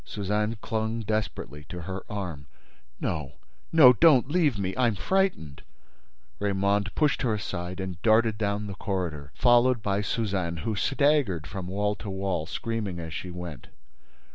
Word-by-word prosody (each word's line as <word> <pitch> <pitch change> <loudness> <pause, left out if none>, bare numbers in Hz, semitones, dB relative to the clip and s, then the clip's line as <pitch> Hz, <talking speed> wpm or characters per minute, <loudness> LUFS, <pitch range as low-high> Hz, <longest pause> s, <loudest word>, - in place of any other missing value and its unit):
Suzanne 105 +2 -1
clung 110 +1 -1
desperately 105 - -3
to 90 0 -6
her 95 +2 -5
arm: 90 -9 -5 0.5
"No—no—don't 130 - +3
leave 155 - +2
me—I'm 105 +4 +1
frightened—" 180 - 0 0.8
Raymonde 100 0 +1
pushed 150 -2 +2
her 115 -4 +1
aside 90 -2 -5
and 95 -2 -5
darted 110 -1 +3
down 105 0 -1
the 100 - -5
corridor, 85 -7 -3
followed 120 -1 +4
by 100 0 0
Suzanne, 95 -6 -1
who 110 - 0
staggered 135 - +2
from 95 -1 -6
wall 105 +2 0
to 105 - -7
wall, 95 -4 -2
screaming 105 -4 -3
as 80 -2 -6
she 90 - -5
went. 85 -6 -7
100 Hz, 135 wpm, -27 LUFS, 90-115 Hz, 0.8 s, followed